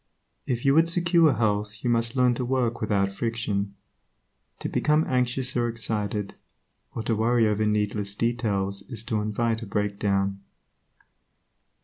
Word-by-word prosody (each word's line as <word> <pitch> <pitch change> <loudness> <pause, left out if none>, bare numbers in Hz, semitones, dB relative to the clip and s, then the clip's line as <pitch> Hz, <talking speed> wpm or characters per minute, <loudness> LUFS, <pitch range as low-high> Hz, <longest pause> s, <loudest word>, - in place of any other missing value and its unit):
If 120 0 -2
you 135 - +5
would 165 +2 +4
secure 170 -3 +4
health 105 -2 0
you 120 - +1
must 115 +1 0
learn 125 -1 +4
to 125 - -3
work 120 -2 0
without 100 -2 +1
friction. 100 -2 -2 0.8
To - - -4
become 155 +1 +2
anxious 125 0 0
or 120 -1 +1
excited, 105 -3 -2 0.6
or 115 - -3
to 115 0 0
worry 115 +1 +3
over 105 0 +1
needless 105 -1 -1
details 105 -4 -1
is 115 -4 -5
to 110 -3 -1
invite 115 +2 -1
a 115 - -7
breakdown. 100 -1 -1
115 Hz, 140 wpm, -26 LUFS, 105-120 Hz, 0.8 s, you